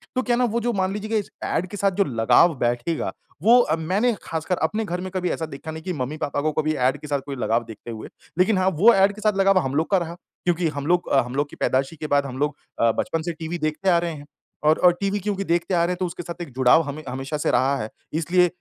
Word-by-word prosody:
तो 255 - +2
क्या 245 -1 +1
है - - -1
ना 250 - +4
वो 235 - +1
जो 240 +1 0
मान 190 -2 0
लीजिए 210 +1 -5
कि 225 - +1
इस 205 - -7
ऐड 180 - -1
के 205 - -7
साथ 195 0 +2
जो 200 - +3
लगाव 135 +5 +4
बैठेगा 120 +7 -1 0.3
वो 235 +4 +7
अ, 160 - +1
मैंने 190 +9 +1
ख़ासकर 165 +3 -2
अपने 215 +7 0
घर 180 -2 -3
में 185 - -5
कभी 180 -1 -1
ऐसा 160 - -2
देखा 155 +1 -8
नहीं 160 0 -8
कि 185 - -3
मम्मी-पापा 145 +1 -3
को 155 +1 +1
कभी 155 +1 0
ऐड 130 -2 +1
के 150 - -8
साथ 145 -1 0
कोई 140 -1 -5
लगाव 115 -2 0
देखते 115 +1 -9
हुए। 110 -1 -8 0.3
लेकिन 190 +3 +4
हाँ, 185 0 +2
वो 195 +7 +5
ऐड 195 +1 +4
के 215 - -10
साथ 215 -2 +2
लगाव 195 0 +4
हम 135 -5 -2
लोग 160 +2 +1
का 195 - +5
रहा 170 -2 -3 0.3
क्योंकि 175 -1 +1
हम 145 -1 -5
लोग 175 +1 +1
अ, 135 - +4
हम 125 +1 -7
लोग 145 +1 0
की - - -12
पैदाइशी 135 +4 0
के 155 0 -5
बाद 145 -1 +2
हम 130 -2 -6
लोग 145 +1 0 0.2
अ, 115 -1 +4
बचपन 165 +7 -2
से 170 +2 -3
टीवी 160 +2 -5
देखते 155 +5 0
आ 175 - +5
रहे 170 0 -2
हैं। 145 -1 -10 0.4
और 155 +1 +4
और 180 -1 +6
टीवी 200 +1 0
क्योंकि 195 0 -2
देखते 175 +1 0
आ 170 -1 +3
रहे 175 - +1
हैं - - -6
तो 185 - 0
उसके 175 0 -6
साथ 170 0 -7
एक 165 - -6
जुड़ाव 130 +5 +5
हमे 145 +2 -6
हमेशा 135 +4 -4
से 150 - 0
रहा 135 +2 +2
है। 110 - -5 0.2
इसलिए 175 +3 +3
165 Hz, 285 wpm, -23 LUFS, 145-190 Hz, 0.4 s, वो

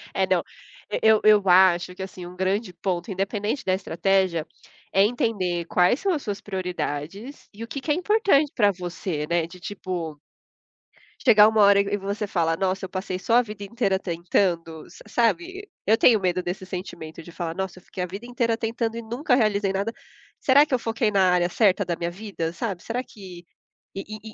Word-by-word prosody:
eh, - - +2
não, - - +2 0.5
e - - -1
eu 220 -1 +5
eu 210 -1 +6
acho 180 -1 +5
que, 190 - -9
assim, 185 -1 -8
um 180 +1 -10
grande 190 +2 -1
ponto, 180 +2 -3
independente 205 +6 -2
da 185 - +1
estratégia, 185 -2 0 0.5
é 195 - +4
entender 200 -6 0
quais 180 - +3
são 390 0 0
as 300 - -3
suas 205 -1 -4
prioridades 185 - -5
e 215 +3 -8
o - - -7
que 275 - -5
que 300 +3 -2
é - - +5
importante 360 -5 +2
pra 205 -4 +4
você, 175 -4 -4
né, 170 -1 +1
de 170 +2 -13
tipo, 175 -5 -5 1.0
chegar 215 -4 +7
uma 220 -1 +2
hora 200 0 +6
e 200 0 -3
e - - +2
você 200 +2 -3
fala: 165 -4 0
"Nossa, 190 +2 -1
eu - - -9
passei 185 0 -4
só 225 +5 +1
a 245 - +7
vida 210 -3 -8
inteira 200 -3 0
tentando", 170 -2 -1
sa - - -15
sabe? 350 - -1 0.2
Eu 220 +2 +4
tenho 225 -1 +5
medo 180 -1 0
desse 180 +1 -5
sentimento, 180 -4 -7
de 170 - -12
falar: 165 -2 -4
"Nossa, 190 0 -5
eu - - -25
fiquei 185 - -7
a - - -3
vida 195 +6 -8
inteira 235 -2 0
tentando 225 0 -2
e - - -4
nunca 245 +4 0
realizei 205 -4 +1
nada. 200 +3 -1 0.5
Será 285 +2 +5
que 295 - -6
eu 255 - +3
foquei 225 -1 0
na 190 -2 +4
área 175 -1 +2
certa 200 0 +3
da 170 0 -1
minha 170 - -2
vida, 180 -4 -5
sabe? 185 -1 -4
Será 245 +2 -3
que" 185 -7 -12 0.5
E 195 - -4
e 215 0 -7
195 Hz, 200 wpm, -24 LUFS, 180-225 Hz, 1.0 s, chegar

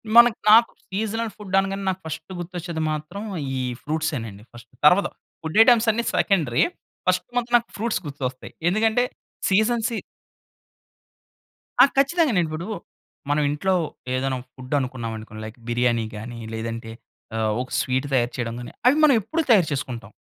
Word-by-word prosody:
మనక్ 235 -1 +8
నాకు 230 +1 +7 0.2
seasonal 220 +3 -2
food 195 -3 -4
అనగానే 195 0 -2
నాకు 190 0 -2
ఫస్టు 160 +3 -6
గుర్తొచ్చేది 170 -2 -5
మాత్రం, 155 +7 -5 0.3
ఈ - - -1 0.2
ఫ్రూట్సేనండి 145 -10 -3
ఫస్ట్. 120 - -13 0.2
తరువాత 180 +7 +6 0.3
ఫుడ్ 160 +6 -3
ఐటెమ్స్ 235 -1 +5
అన్ని 235 +2 -1
సెకండరీ. 155 - +2 0.4
ఫస్ట్ - - +2
మాత్రం 240 0 -1
నాకు 235 - -6
ఫ్రూట్స్ 225 0 -1
గుర్తొస్తాయి. 130 -3 -5 0.2
ఎందుకంటే, 220 +5 +2 0.5
సీజన్‌ 220 +3 +2
సీ 230 - -3 1.9
ఆ! - - +10
ఖచ్చితంగా. 290 +1 +3
నేను 170 - +2
ఇప్పుడు 155 +4 -5 0.6
మనం 150 +1 +2
ఇంట్లో 185 +6 0 0.4
ఏదైనా 130 0 0 0.2
ఫుడ్డు 130 +1 -7
అనుకున్నావనుకోండి. 115 -4 -5
లైక్ 110 +2 -9
బిర్యానీ 120 -1 +1
గాని, 115 +2 -7 0.2
లేదంటే 115 0 -5 0.4
ఆహ్, 110 -1 +1
ఒక 130 - -6
స్వీట్ 130 +2 0
తయారు 120 -2 +2
చేయడం 115 -1 -3
గాని, 120 - -8 0.2
అవి 270 - +6
మనం 295 -3 +7
ఎప్పుడూ 320 - -1
తయారు 195 -8 +6
చేసుకుంటాం. 130 -4 -4
160 Hz, 145 wpm, -24 LUFS, -, 1.9 s, ఆ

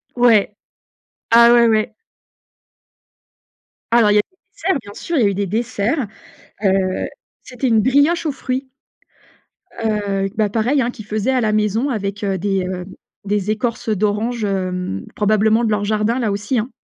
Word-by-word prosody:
Ouais, 225 -4 +4 0.8
ah, 235 +1 +7
ouais, 240 -1 +6
ouais. 215 -1 +1 2.0
Alors, 230 -3 +5
il - - +3
y - - +6
a 210 - +5
des 370 - -37 0.3
desserts, 340 - +2
bien 205 - -11
sûr, 330 +9 -3
il 245 - +3
y - - +4
a - - +4
eu 200 - -1
des 200 0 -2
desserts, 230 - -1 0.6
heu, 190 -1 +1 0.4
c'était 255 +1 -3
une 225 -2 +4
brioche 285 +7 +2
aux 300 - 0
fruits, 265 0 -4 1.2
heu, 200 -2 0
bah, 215 -2 +2
pareil, 240 +6 +1
hein, 235 - -1
qu'il 225 -3 -11
faisait 215 +4 -1
à 255 - +2
la 215 -2 +1
maison 215 +5 +1
avec, 205 -3 -3
heu, 195 -1 -1
des, 195 0 -1
heu, 180 -1 -4 0.4
des 205 0 -1
écorces 225 +2 -2
d'orange, 215 +2 0
hem, 180 - -2
probablement 215 +2 +2
de 220 - +1
leur 205 -1 0
jardin 215 +3 0
là 230 -4 0
aussi, 205 +5 -1
hein. 230 +5 -2
215 Hz, 170 wpm, -19 LUFS, 205-240 Hz, 2.0 s, ah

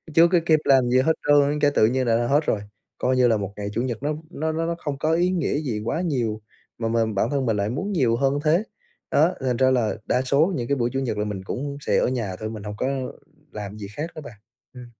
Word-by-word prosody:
chưa 165 +1 +7
có 175 0 +3
kịp 155 -2 +4
làm 135 -2 +5
cái 120 - -1
gì 130 - +5
hết 160 +5 +3
trơn 145 0 +4
cái 145 -1 +3
tự - - +5
nhiên 130 +1 0
là 115 -1 +3
đã 120 0 0
hết 145 +4 +2
rồi. 105 - 0 0.4
Coi 130 +1 +1
như 125 -1 +5
là 115 -2 +3
một 100 -1 -5
ngày 100 -1 -4
Chủ 115 - 0
nhật 125 -1 -3
nó 150 +1 0
v - - -6
nó 160 0 -2
nó 165 +1 -1
nó 170 - -1
không 145 -3 -4
có 155 +2 +1
ý 175 +2 +2
nghĩa 180 -5 0
gì 120 -9 -3
quá 160 - -1
nhiều, 120 -11 -1 0.4
mà 115 - -2
mình, 115 -1 0
bản 105 +4 +1
thân 140 -2 0
mình 110 -3 +1
lại 100 +1 0
muốn 165 - -3
nhiều 130 - +2
hơn 135 +3 +1
thế. 165 +6 +3 0.5
Đó, 160 +5 +4
thành 125 -2 0
ra 130 +1 +4
là 120 -5 +1
đa 125 - +1
số 145 +8 +2
những 120 -5 -3
cái 140 - +1
buổi 120 -1 +1
Chủ 135 - 0
nhật 120 -5 -2
là 105 - -1
mình 100 -3 -5
cũng 140 +8 -4
sẽ - - +1
ở - - +2
nhà 115 -7 -2
thôi, 110 - -4
mình 110 -2 -7
hông 105 0 -6
có 130 - -1 0.6
làm 105 0 -7
gì 100 -2 -7
khác 145 +11 -5
nữa 155 - -7
bạn, 145 -6 -10 0.4
ừm. 125 -1 -10
130 Hz, 285 wpm, -24 LUFS, 115-150 Hz, 0.6 s, chưa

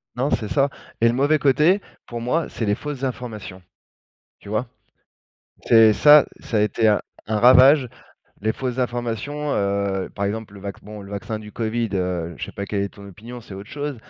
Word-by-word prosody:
Non, 130 +3 0
c'est 110 - -1
ça, 140 +5 +2 0.3
et 115 - +6
le 115 - +2
mauvais 145 +4 +2
côté, 150 +8 +3 0.2
pour 120 -1 -6
moi, 155 +8 0
c'est 115 - -4
les 105 0 +1
fausses 145 +1 -6
informations. 110 -7 -6 0.8
Tu 100 - -11
vois? 110 +4 -1 1.0
C'est 115 -2 +6
ça 150 +4 +7
ça 110 - -3
a - - +3
été 110 +1 +2
un 105 - +4 0.3
un 110 -1 +1
ravage, 130 +2 +6 0.5
les 110 +2 0
fausses 125 0 -4
informations, 125 +4 -3
heu, 100 -1 -1
par 100 - -2
exemple, 105 0 -4
le 100 - -11
vacc 100 0 -7
bon, 105 0 -9
le 100 - -12
vaccin 105 +2 -4
du 105 0 -11
covid, 115 0 -2
heu, 90 -3 -2
je - - -4
sais - - -10
pas 100 - -5
quelle 100 0 -1
est 100 - -2
ton 100 0 -14
opinion, 115 +6 -10
c'est 110 -4 -11
autre 100 +2 -10
chose, 145 -2 -4
115 Hz, 200 wpm, -22 LUFS, 100-130 Hz, 1.0 s, ça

